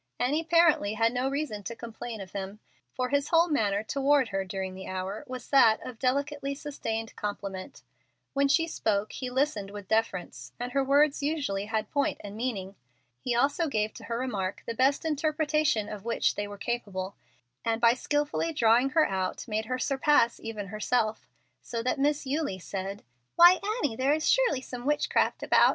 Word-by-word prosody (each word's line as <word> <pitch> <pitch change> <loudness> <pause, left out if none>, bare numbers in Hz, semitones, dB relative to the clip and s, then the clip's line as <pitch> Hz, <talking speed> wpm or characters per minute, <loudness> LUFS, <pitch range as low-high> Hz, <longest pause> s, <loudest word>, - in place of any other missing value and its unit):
Annie 280 +6 +1
apparently 330 -11 +3
had 230 +1 +2
no 255 +2 0
reason 275 -7 -3
to 235 +4 -6
complain 230 -1 -7
of 185 -1 -9
him, 195 +1 -6 0.3
for 255 0 -2
his 285 +1 +1
whole 335 0 +4
manner 210 -8 +1
toward 275 +1 +2
her 195 -1 -1
during 190 0 -4
the 190 0 -8
hour 190 +5 -4
was 255 -1 -7
that 230 -6 +6
of 245 -3 -8
delicately 280 +2 -1
sustained 225 -6 -4
compliment. 200 -2 -5 0.5
When 280 0 +3
she 325 +4 +3
spoke 210 -9 -1
he 255 - -5
listened 250 -6 0
with 205 -1 -9
deference, 185 - -1
and 245 0 -4
her 275 +1 +2
words 285 +2 +3
usually 280 -10 -1
had 220 0 -2
point 285 -1 0
and 205 0 -7
meaning. 210 -5 -3 0.5
He 245 -2 -1
also 285 +7 +2
gave 215 -5 -1
to - - -11
her 230 - -3
remarks 205 -7 -3
the 230 - -3
best 265 +6 +2
interpretation 305 -5 +1
of 210 -2 -7
which 230 0 +1
they 205 0 -3
were 205 0 -8
capable, 200 -4 -3 0.5
and 225 0 0
by 235 0 +6
skilfully 295 +5 -1
drawing 240 0 +4
her 315 - +6
out 190 +3 -3
made 220 0 -1
her 255 +3 -2
surpass 265 -2 +2
even 215 -3 -6
herself, 215 +1 -1 0.3
so 230 -1 -4
that 255 +3 0
Miss 290 +1 +1
Eulie 280 -7 -1
said, 195 +2 -5 0.3
"Why, 350 +2 +8 0.2
Annie, 255 -6 0
there 280 +4 +2
surely 315 - +2
is - - -13
some 250 +1 -6
witchcraft 295 0 +1
about. - - +5
240 Hz, 180 wpm, -28 LUFS, 205-285 Hz, 0.5 s, Why